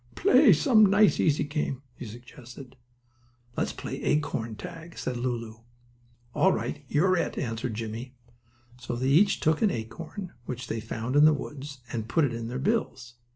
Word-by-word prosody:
"Play 400 +3 +6
some 235 -7 +5
nice, 205 +2 +4
easy 150 -2 +2
game," 145 -2 -3
he 120 - -9
suggested. 125 +3 -12 0.8
"Let's - - -1
play - - -6
acorn 115 -7 -1
tag," 165 +7 -9
said 125 - -3
Lulu. 120 -2 -3 0.7
"All - - +4
right, - - -3
you're 185 +6 +3
it," - - -2
answered 115 -1 -3
Jimmie. 115 +3 -6 0.6
So 120 0 -4
they 130 +2 0
each 195 +8 +4
took 155 0 +2
an 215 - +4
acorn 165 - -6
which 125 0 -5
they 115 -1 -3
found 115 +3 -4
in 145 +1 +7
the 155 - +6
woods 140 -2 -8
and 115 -1 -4
put 155 +5 +3
it 125 - -2
in 115 0 -4
their 125 +2 -4
bills. 130 - -1
130 Hz, 165 wpm, -27 LUFS, 120-155 Hz, 0.8 s, in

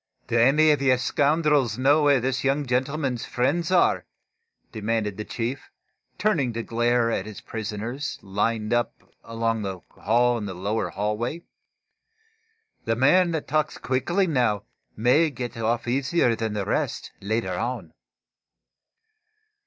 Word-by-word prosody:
"Do 120 - -3
any 140 +7 +5
of 145 -2 +1
you 130 -2 +4
scoundrels 145 -3 +2
know 140 +4 +4
where 145 -2 +4
this 130 +1 -1
young 140 +2 +1
gentleman's 130 0 -1
friends 145 +7 0
are?" 185 -1 +3 0.6
demanded 110 -1 -2
the 105 - -5
chief, 120 +5 -4 0.5
turning 155 - +1
to 115 0 -3
glare 120 0 +1
at 100 -2 -2
his 110 - -8
prisoners, 110 +6 -5
lined 105 +3 -1
up 120 0 -1 0.2
along 115 -1 -1
the 95 -3 -5
wall 120 +3 +2
in 105 - -5
the 95 - -6
lower 100 +5 -2
hallway. 105 - -3 1.4
"The 115 - +1
man 175 +9 +4
that 160 - -3
talks 155 0 0
quickly 135 +11 0
now 120 - +1 0.3
may 125 +9 +4
get 125 -3 -6
off 115 +1 -1
easier 130 0 +1
than 110 -1 -3
the 105 -2 -2
rest, - - -2
later 100 -2 -1
on." 110 -3 -4
120 Hz, 135 wpm, -25 LUFS, 110-140 Hz, 1.4 s, any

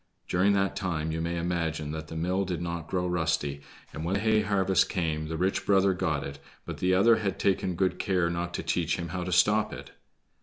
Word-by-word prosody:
During 95 +3 +3
that 100 -1 +1
time 85 -5 -2
you 80 +1 -2
may 85 +1 -2
imagine 85 -3 -2
that 80 0 -5
the 80 - -8
mill 90 +4 0
did 90 -3 -3
not 85 -2 -4
grow 90 -1 -1
rusty, 80 -5 -1 0.3
and 80 - -5
when 90 +4 0
hay 110 +1 +3
harvest 95 -2 +2
came 80 -4 -1
the 80 0 -4
rich 95 +3 0
brother 95 -1 +3
got 75 -5 -1
it, 70 0 -7 0.3
but - - -6
the 90 0 +2
other 115 +4 +5
had 100 -3 -2
taken 95 -2 0
good 95 +1 0
care 90 -4 +1
not 85 +1 -3
to - - -3
teach 85 -2 0
him 85 -1 -5
how 90 +1 -3
to 90 - -4
stop 105 +5 +3
it. - - -9
90 Hz, 220 wpm, -28 LUFS, 80-95 Hz, 0.3 s, other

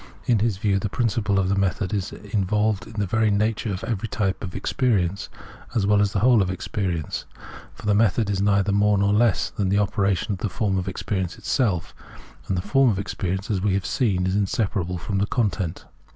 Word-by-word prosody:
In 120 -3 +3
his 110 -2 0
view, 100 -1 +1
the 105 - -2
principle 110 -2 0
of 95 -1 +2
the 100 - +1
method 100 +1 0
is 100 -2 -2
involved 105 0 -1
in 110 - -11
the 105 -2 -1
very 110 +3 +2
nature 105 +1 0
of 95 - -4
every 115 -2 -2
type 100 -4 -2
of 90 -3 -6
experience, 100 -7 0 0.5
as 105 -4 +2
well 105 0 +4
as 100 - +2
in - - -13
the 100 - +1
whole 125 -4 +6
of 95 - 0
experience. 90 -3 -3 0.5
For - - -12
the 105 - +3
method 110 0 +2
is 100 -1 -1
neither 100 -1 +2
more 100 +1 +3
nor 100 +1 +2
less 110 -1 +2
than 100 -4 -1
the 100 - +2
opera 100 -1 +2
tion 105 - -3
of 95 - -3
the 105 - -2
form 95 +1 0
of 90 - -4
experience 95 -1 -3
itself; 100 - 0 0.5
and 95 - -1
the 90 - -2
form 130 +6 +3
'of 100 - 0
experience, 95 0 -3
as 95 -3 0
we 100 -1 +1
have 95 -1 -1
seen, 95 -8 +1
is 95 +1 0
inseparable 95 -3 -1
from 100 +3 -2
the 100 - +1
content. 100 -8 -1
100 Hz, 220 wpm, -24 LUFS, 95-105 Hz, 0.5 s, whole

